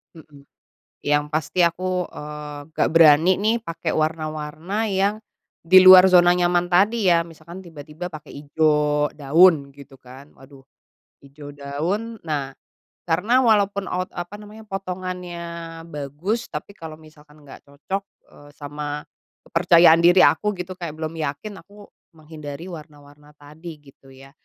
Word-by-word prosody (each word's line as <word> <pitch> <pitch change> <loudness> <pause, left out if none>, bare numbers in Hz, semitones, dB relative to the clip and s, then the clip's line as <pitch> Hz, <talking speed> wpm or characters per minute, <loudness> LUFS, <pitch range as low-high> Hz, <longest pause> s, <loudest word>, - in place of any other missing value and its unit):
Mhm. 145 -3 -17 0.6
Yang 145 0 +1
pasti 160 +3 -2
aku, 180 +1 -2
eee, 150 -1 -9
nggak - - 0
berani 165 +2 +6
nih 220 +3 +1
pakai 165 -5 -5
warna-warna 155 +6 -3
yang 195 +1 0 0.5
di 185 +3 +6
luar 185 0 +9
zona 175 -1 +6
nyaman 175 0 +1
tadi, 205 +4 +2
ya. 170 -1 +3
Misalkan 170 +3 -12
tiba-tiba 160 +1 -9
pakai 155 -3 -11
hijau 150 0 0
daun 150 0 +3
gitu 140 0 -15
kan, 130 +3 -15
waduh, 135 0 -18 0.6
hijau 145 +1 -12
daun. 175 +11 -4
Nah, 140 -3 -3 0.5
karena 210 +11 +2
walaupun 200 -4 +1
out 185 0 -3
apa 175 +4 -7
namanya, 210 +1 -13
potongannya 180 -2 -6 0.5
bagus, 150 - -4
tapi 200 - -8
kalau 160 -2 -9
misalkan 150 -1 -19
nggak 135 - -13
cocok, 145 +8 -5 0.3
eee, 145 0 -17
sama 145 0 -6 0.4
kepercayaan 165 -1 +5
diri 175 +1 +6
aku 210 0 +3
gitu 180 0 -7
kayak 170 -4 -7
belum 160 +1 -5
yakin, 160 +7 -5
aku 205 +2 -17 0.3
menghindari 155 0 -10
warna-warna 150 -2 -14
tadi, 155 +2 -12
gitu, 135 -1 -20
ya. 135 +1 -16
160 Hz, 135 wpm, -22 LUFS, 145-185 Hz, 0.6 s, luar